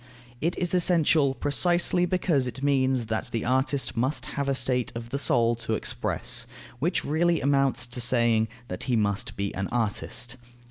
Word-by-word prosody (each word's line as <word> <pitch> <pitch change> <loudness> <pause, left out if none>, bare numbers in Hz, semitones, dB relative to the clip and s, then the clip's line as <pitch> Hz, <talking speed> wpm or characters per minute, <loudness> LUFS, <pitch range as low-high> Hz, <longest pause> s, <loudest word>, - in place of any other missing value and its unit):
It 170 +3 -1
is 180 -1 -2
essential, 160 -6 +3
precisely 175 +5 +2
because 170 -7 +1
it 125 +3 -7
means 130 -3 +1
that 110 +3 -3
the 115 - -2
artist 130 +2 0
must 130 +6 -1
have 140 0 -2
a 135 - +1
state 125 -2 0
of 115 0 -7
the 140 - -2
soul 120 -4 +3
to 115 - -2
express, - - 0 0.3
which 170 +5 0
really 165 +2 +1
amounts 135 -2 +1
to 125 0 -5
saying, 115 -2 +2 0.2
that 110 +5 -5
he 125 -2 +1
must 100 -3 -1
be 100 0 -3
an 95 0 -3
artist. 120 +1 -2
130 Hz, 170 wpm, -26 LUFS, 115-145 Hz, 0.3 s, essential